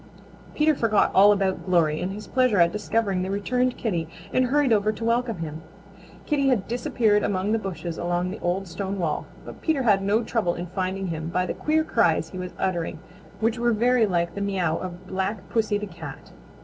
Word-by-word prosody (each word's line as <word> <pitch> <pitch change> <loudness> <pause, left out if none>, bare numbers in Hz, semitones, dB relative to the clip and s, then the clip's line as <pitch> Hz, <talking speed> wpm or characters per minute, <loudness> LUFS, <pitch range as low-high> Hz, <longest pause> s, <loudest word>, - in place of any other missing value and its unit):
Peter 310 +1 +4
forgot 225 -6 +2
all 200 +2 +7
about 195 -2 0
Glory 165 -4 +2
in 180 - -1
his 210 +2 -7
pleasure 255 -6 +2
at 170 0 +5
discovering 210 -2 0
the 185 - -2
returned 250 +6 0
Kitty 175 -8 -2 0.3
and 255 - +3
hurried 270 -1 +3
over 210 0 +2
to 220 +1 -6
welcome 235 -2 +1
him. 160 -1 -6 0.6
Kitty 280 -2 +1
had 245 -8 +1
disappeared 225 -3 +1
among 195 +1 0
the 225 - +2
bushes 175 -4 -5
along 175 +1 -1
the - - -7
old 185 +2 -1
stone 195 +3 -4
wall, 170 -5 -2 0.2
but - - -10
Peter 310 -5 +1
had 205 -5 +4
no 205 +4 +1
trouble 220 -6 0
in 175 - -4
finding 190 +1 -3
him 160 0 -4
by 180 +1 0
the - - -2
queer 315 +1 +1
cries 175 - +1
he 185 - -6
was 180 0 -6
uttering, 170 -4 -1 0.4
which 225 +2 +1
were 240 0 +2
very 235 +1 +3
like 170 -2 0
the 200 - -5
meow 185 -5 0
of 180 +1 -6
Black 190 +1 -3
Pussy 220 -2 +1
the 210 - -4
Cat. 165 -7 -10
200 Hz, 200 wpm, -25 LUFS, 180-230 Hz, 0.6 s, all